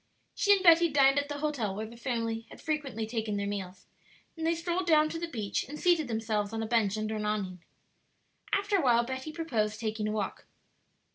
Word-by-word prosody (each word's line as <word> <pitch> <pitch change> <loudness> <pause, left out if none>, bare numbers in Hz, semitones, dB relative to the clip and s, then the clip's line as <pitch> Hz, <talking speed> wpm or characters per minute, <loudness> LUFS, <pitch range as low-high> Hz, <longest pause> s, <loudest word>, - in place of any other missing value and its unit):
She 410 - +2
and 390 -1 +1
Betty 335 -1 +7
dined 275 -1 +5
at 285 0 -4
the 290 - -3
hotel 280 -10 -2
where 215 +2 -3
the 230 +2 -11
family 230 -2 -3
had - - -13
frequently 280 -8 -2
taken 220 -2 -2
their 200 - -1
meals, 190 -2 -5 0.5
then 325 -1 -4
they 335 +1 +2
strolled 345 +2 -2
down 310 -2 +5
to 330 - -4
the 340 - -3
beach 215 -10 -2
and 300 - -6
seated 340 -5 +3
themselves 220 -2 -1
on 225 0 -2
a - - -3
bench 215 -3 +1
under 215 0 -2
an 210 - -3
awning. 190 -4 -2 0.9
After 400 0 +2
a - - +2
while 240 -4 +4
Betty 260 +4 -5
proposed 225 -10 -1
taking 215 -1 -2
a - - -1
walk. 210 -2 -4
235 Hz, 210 wpm, -30 LUFS, 215-310 Hz, 0.9 s, Betty